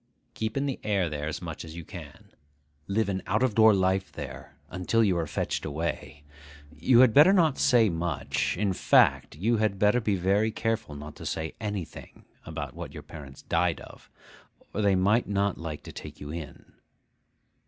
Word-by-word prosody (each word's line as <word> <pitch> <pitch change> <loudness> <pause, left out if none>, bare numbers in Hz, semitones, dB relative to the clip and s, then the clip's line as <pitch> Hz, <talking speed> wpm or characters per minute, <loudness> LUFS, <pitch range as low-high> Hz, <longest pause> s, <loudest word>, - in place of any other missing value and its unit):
Keep 110 +3 -3
in 140 - 0
the 135 -2 -3
air 100 -5 +1
there 75 0 -3
as 80 +3 -5
much 80 -3 -6
as 80 0 -10
you 85 -1 -8
can. - - -11 0.6
Live 105 +2 0
an 95 -1 -2
out 105 +5 +1
of 130 -4 +2
door 110 +1 +7
life 95 -1 +1
there, - - -9
until 90 +6 +1
you 95 -4 +2
are 85 -2 -1
fetched - - -2
away. 75 -1 -4 0.5
You 115 - +5
had 125 -4 +6
better 150 +6 +8
not 160 -7 +3
say 120 -3 +5
much—in 90 +3 -1
fact, - - +3
you 110 +9 +1
had 105 -2 0
better 105 +5 +3
be 105 -3 +1
very 100 +4 +2
careful 115 -9 -2
not 75 +1 -9
to - - -9
say 80 0 -3
anything—about 90 -8 -7
what - - -8
your 75 - -8
parents 75 -3 -11
died 85 0 0
of, - - -14 0.6
or 105 - -1
they 100 -2 +3
might 100 +6 +2
not 100 -1 0
like 80 -2 -6
to - - -9
take - - -10
you 75 0 -7
in. 80 -2 -9
95 Hz, 180 wpm, -27 LUFS, 80-110 Hz, 0.6 s, better